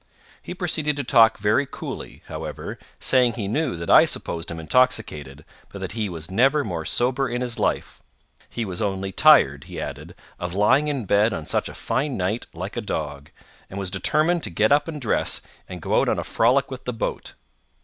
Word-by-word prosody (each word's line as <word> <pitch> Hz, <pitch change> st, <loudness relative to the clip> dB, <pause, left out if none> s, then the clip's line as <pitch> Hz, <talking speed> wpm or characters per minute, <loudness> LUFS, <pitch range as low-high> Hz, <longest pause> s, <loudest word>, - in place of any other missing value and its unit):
He 180 Hz, -, -7 dB
proceeded 160 Hz, -5 st, 0 dB
to 145 Hz, -, -3 dB
talk 115 Hz, -2 st, +5 dB
very 105 Hz, +7 st, +2 dB
coolly, -, -, -8 dB
however, -, -, -6 dB, 0.2 s
saying 125 Hz, -3 st, +3 dB
he 110 Hz, -4 st, -4 dB
knew 140 Hz, -, -1 dB
that 85 Hz, 0 st, -3 dB
I -, -, +8 dB
supposed 85 Hz, 0 st, -4 dB
him 85 Hz, -, -5 dB
intoxicated, 80 Hz, -, 0 dB, 0.3 s
but -, -, -8 dB
that -, -, -5 dB
he 110 Hz, -2 st, -2 dB
was 80 Hz, -1 st, -7 dB
never 135 Hz, +8 st, +3 dB
more 85 Hz, -8 st, -4 dB
sober 130 Hz, +2 st, 0 dB
in 120 Hz, +1 st, -2 dB
his 125 Hz, -2 st, -3 dB
life. -, -, -1 dB, 0.5 s
He 115 Hz, -, -3 dB
was 90 Hz, -1 st, -4 dB
only 95 Hz, -2 st, -2 dB
tired, 70 Hz, -6 st, +5 dB
he -, -, -7 dB
added, -, -, -7 dB, 0.2 s
of 90 Hz, +1 st, -4 dB
lying 120 Hz, +9 st, +4 dB
in 140 Hz, -6 st, -2 dB
bed 105 Hz, +3 st, +3 dB
on 80 Hz, -, -6 dB
such -, -, -1 dB
a -, -, -10 dB
fine 140 Hz, -2 st, -2 dB
night 95 Hz, +5 st, -2 dB
like 95 Hz, +5 st, -6 dB
a 120 Hz, -, -2 dB
dog, 75 Hz, -7 st, -4 dB, 0.4 s
and 95 Hz, -, -8 dB
was 95 Hz, -2 st, -3 dB
determined 155 Hz, -, +1 dB
to -, -, -3 dB
get 105 Hz, +6 st, +1 dB
up 145 Hz, +3 st, +4 dB
and 155 Hz, -2 st, -5 dB
dress, 120 Hz, -, 0 dB, 0.3 s
and 90 Hz, -3 st, -8 dB
go -, -, +2 dB
out -, -, +1 dB
on -, -, +1 dB
a -, -, -2 dB
frolic 135 Hz, +5 st, +2 dB
with 130 Hz, 0 st, -8 dB
the 125 Hz, -, -2 dB
boat. 115 Hz, -, -4 dB
110 Hz, 200 wpm, -23 LUFS, 90-130 Hz, 0.5 s, I